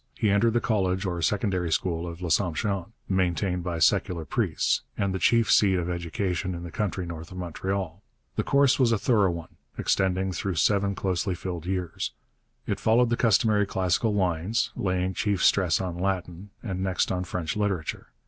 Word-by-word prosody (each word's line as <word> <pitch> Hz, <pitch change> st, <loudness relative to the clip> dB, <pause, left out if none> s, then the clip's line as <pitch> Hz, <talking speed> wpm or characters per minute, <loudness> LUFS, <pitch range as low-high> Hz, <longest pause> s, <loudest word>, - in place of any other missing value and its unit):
He 105 Hz, -, +2 dB
entered 110 Hz, +3 st, +3 dB
the 120 Hz, -, +3 dB
college 95 Hz, -4 st, 0 dB
or 85 Hz, -2 st, -2 dB
secondary 95 Hz, -2 st, 0 dB
school 85 Hz, 0 st, -1 dB
of 85 Hz, +1 st, -7 dB
L'Assomption, 90 Hz, +2 st, 0 dB, 0.2 s
maintained 90 Hz, -1 st, 0 dB
by 85 Hz, -1 st, -3 dB
secular 80 Hz, +1 st, +2 dB
priests, -, -, 0 dB, 0.2 s
and 100 Hz, -1 st, 0 dB
the 95 Hz, -, -2 dB
chief 115 Hz, +1 st, +3 dB
seat 100 Hz, -3 st, +5 dB
of 90 Hz, -1 st, -1 dB
education 90 Hz, +1 st, -2 dB
in 85 Hz, -, -6 dB
the 85 Hz, -, -7 dB
country 95 Hz, -2 st, -2 dB
north 85 Hz, 0 st, -8 dB
of 95 Hz, -, -8 dB
Montreal. 95 Hz, +1 st, -3 dB, 0.3 s
The -, -, +1 dB
course 140 Hz, -1 st, +3 dB
was 125 Hz, -3 st, +4 dB
a 115 Hz, -, +3 dB
thorough 105 Hz, -3 st, +3 dB
one, 85 Hz, -2 st, -6 dB, 0.2 s
extending 95 Hz, 0 st, +1 dB
through 95 Hz, 0 st, -3 dB
seven 100 Hz, +5 st, +2 dB
closely 95 Hz, 0 st, -1 dB
filled 90 Hz, -1 st, -5 dB
years. 90 Hz, -3 st, -3 dB, 0.5 s
It -, -, -2 dB
followed 115 Hz, +2 st, +3 dB
the -, -, +3 dB
customary 110 Hz, -3 st, +3 dB
classical 95 Hz, +4 st, +1 dB
lines, 95 Hz, +3 st, 0 dB
laying 95 Hz, -1 st, -1 dB
chief 100 Hz, -1 st, 0 dB
stress 90 Hz, -5 st, +4 dB
on 90 Hz, -2 st, -4 dB
Latin, 95 Hz, 0 st, -3 dB
and 95 Hz, -5 st, -3 dB
next 95 Hz, -1 st, 0 dB
on 90 Hz, 0 st, -1 dB
French 85 Hz, -3 st, -3 dB
literature. 100 Hz, -6 st, -2 dB
95 Hz, 175 wpm, -26 LUFS, 85-100 Hz, 0.5 s, seat